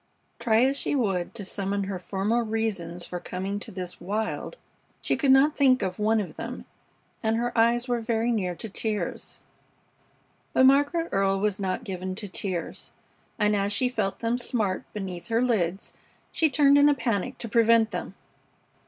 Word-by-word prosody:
Try 230 0 +3
as 275 +1 +1
she - - 0
would 195 -9 -1
to 205 -4 -5
summon 200 +1 -1
her 190 -1 -4
former 205 +6 0
reasons 205 -6 -3
for 180 - -5
coming 190 +3 -4
to - - -7
this 180 -2 -6
wild, 215 - -3 0.4
she - - 0
could 280 - 0
not 270 +3 +5
think 265 -2 +4
of 185 0 -3
one 220 +1 +2
of 200 - -5
them, - - -6 0.6
and 220 -1 +1
her 240 +1 -2
eyes 235 +2 +3
were 240 -1 0
very 230 +1 0
near 185 -6 -1
to 225 - -6
tears. 215 +1 -3 1.2
But 260 - +5
Margaret 285 +5 +3
Earle 195 0 +1
was 210 -1 0
not 190 -2 -2
given 185 0 -4
to 210 +1 -6
tears, 185 -2 -4 0.4
and 210 0 +2
as 200 0 0
she 250 +4 +2
felt 210 -6 -2
them 235 +1 0
smart 215 -6 -1
beneath 185 -4 -6
her 230 -1 +1
lids 200 -7 0 0.4
she 320 - +2
turned 280 0 +5
in 290 +1 +6
a 290 - +3
panic 230 0 -2
to 235 - -6
prevent 230 0 +4
them. - - -5
220 Hz, 175 wpm, -26 LUFS, 195-240 Hz, 1.2 s, in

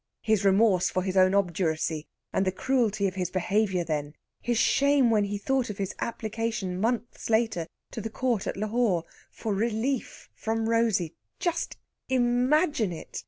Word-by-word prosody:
His 215 -3 +2
remorse 195 -1 +4
for 185 - -1
his 190 0 -2
own 185 0 +5
obduracy, 160 -4 0 0.3
and 190 - +2
the 185 - +1
cruelty 215 -2 +1
of 185 - -3
his 185 -2 -2
behaviour 190 0 +1
then; 150 -2 -3 0.3
his 240 -1 0
shame 280 0 +4
when 210 -2 +3
he 205 0 -3
thought 260 +4 0
of 205 - -5
his 195 -1 -3
application, 220 -5 -3
months 235 +1 -2
later, 220 -7 +1 0.2
to 225 - -5
the 225 - -4
Court 235 -2 -1
at - - -3
Lahore 215 -4 +1 0.3
for 220 -3 -3
"relief" 230 +5 -2
from 225 0 -2
Rosey: 225 -8 +1 0.2
just 345 -2 -2 0.3
imagine 250 - +2
it! 165 - -7
215 Hz, 160 wpm, -27 LUFS, 185-235 Hz, 0.3 s, own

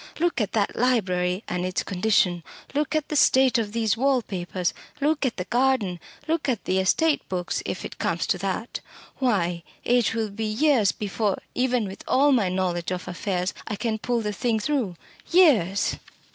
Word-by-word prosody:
Look 340 -6 +1
at 205 - -2
that 205 -3 0
library, 185 -6 +1
and 180 0 -2
its 185 0 -1
condition; 185 -3 +1 0.3
look 295 +1 0
at 310 -2 -1
the 300 - -2
state 260 -3 +4
of 210 -2 -2
these 225 -1 +1
wall 260 0 +2
papers; 180 -2 -3 0.3
look 295 -1 +1
at 240 - -4
the 180 - -3
garden; 240 -6 +1 0.3
look 320 -3 0
at 235 -5 -1
the 190 +1 +1
estate 295 +11 +2
books 180 -1 -2
if - - -4
it - - -8
comes - - 0
to - - 0
that. - - -3 0.4
Why, 180 -9 +1 0.2
it 240 -2 +2
will 220 -2 -1
be 220 +2 -4
years 225 -1 +3
before, 205 -1 -1 0.2
even 250 -2 +1
with 190 - -9
all 285 +2 +4
my 225 -8 +3
knowledge 180 -2 -1
of 180 -1 -4
affairs, 180 +1 -2
I 215 - -2
can 220 0 -2
pull 240 +1 -1
the 210 -1 -2
thing 225 +1 0
through 230 -6 -1 0.3
years!" 240 - +4
220 Hz, 180 wpm, -25 LUFS, 185-255 Hz, 0.4 s, state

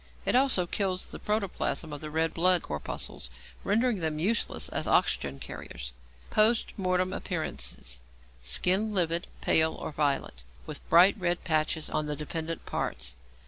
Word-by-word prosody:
It - - +3
also 255 -9 +3
kills 185 0 -1
the - - -7
protoplasm 200 -6 -1
of 145 - -6
the 155 - -5
red 160 +1 0
blood 180 +1 +4
corpuscles, 75 -4 -3 0.3
rendering 225 +1 +2
them 160 -2 -1
useless 210 +8 0
as - - -2
oxygen 70 -1 +2
carriers. 60 -2 -7 0.4
Post 220 +2 +3
Mortem 185 -1 0
Appearances. - - -3 0.4
Skin 185 - +2
livid, 170 -1 +1
pale, 160 0 +4
or - - -5
violet, 140 - -1 0.2
with 155 -2 -8
bright 180 +4 +7
red 175 -1 0
patches 155 -1 +1
on 150 - -1
the 150 - -2
dependent 160 +2 -4
parts. - - -3
165 Hz, 145 wpm, -29 LUFS, 150-190 Hz, 0.4 s, bright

